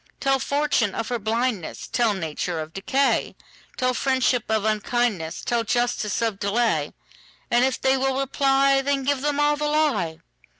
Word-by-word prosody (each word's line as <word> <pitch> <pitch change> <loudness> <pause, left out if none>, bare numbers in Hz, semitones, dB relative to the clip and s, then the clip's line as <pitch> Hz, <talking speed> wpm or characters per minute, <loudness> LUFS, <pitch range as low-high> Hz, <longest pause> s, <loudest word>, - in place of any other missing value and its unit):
Tell 270 -1 +2
fortune 280 -8 0
of - - -3
her 240 -1 -1
blindness; 220 -3 -2
Tell 230 -4 +1
nature 165 0 -3
of 155 0 -6
decay; 265 +8 0 0.4
Tell 255 0 +1
friendship 260 -2 +1
of 220 -1 +1
unkindness; 215 -5 -1
Tell 235 -1 0
justice 235 -1 0
of 220 -4 -1
delay; 200 -8 0 0.6
And 240 +1 +4
if 260 0 +1
they 265 0 +2
will 265 0 0
reply, 275 0 +2
Then 275 0 0
give 280 0 0
them 290 0 0
all 295 0 +3
the 300 0 -1
lie. 275 - +1
245 Hz, 160 wpm, -24 LUFS, 210-270 Hz, 0.6 s, And